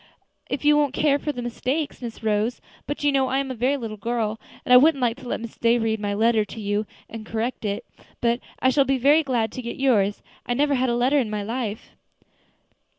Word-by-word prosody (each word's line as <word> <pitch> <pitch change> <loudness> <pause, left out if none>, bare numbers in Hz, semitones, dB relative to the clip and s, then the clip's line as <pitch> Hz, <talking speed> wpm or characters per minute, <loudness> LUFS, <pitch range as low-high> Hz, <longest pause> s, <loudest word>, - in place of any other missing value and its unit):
"If 280 +2 -3
you 295 0 +6
won't 290 -2 +1
care 285 -2 +2
for 295 - -2
the 245 -4 -6
mistakes, 260 +6 -3
Miss 230 -2 -7
Rose. 215 +3 0 0.3
But 290 +1 -4
you 290 - +4
know 270 -1 +2
I 260 +1 0
am 275 -1 -1
a - - -2
very 255 +4 +1
little 225 -4 -6
girl, 225 0 -2 0.3
and 250 - +4
I - - +11
wouldn't 290 +2 +5
like 240 -3 +1
to 260 -2 -11
let - - -2
Miss 230 0 -9
Day 235 +1 +3
read 220 -1 0
my 205 -1 -2
letter 225 0 +3
to 210 +2 -9
you, 205 0 -1 0.3
to 225 - -5
correct 225 +2 -3
it. 200 -1 -2 0.3
But 235 0 +1 0.2
I 260 - +3
shall 280 +1 +4
be 270 0 +1
so 250 - -11
very 295 +3 +6
glad 240 -7 -1
to 255 - -6
get 235 -1 -6
yours. 210 -7 +2 0.2
I 245 - 0
never 290 +2 +2
had 260 -1 +1
a 235 - +1
letter 255 +4 +3
in 235 -5 -1
my 210 -1 -3
life." 225 -1 -4
240 Hz, 240 wpm, -24 LUFS, 220-270 Hz, 0.3 s, I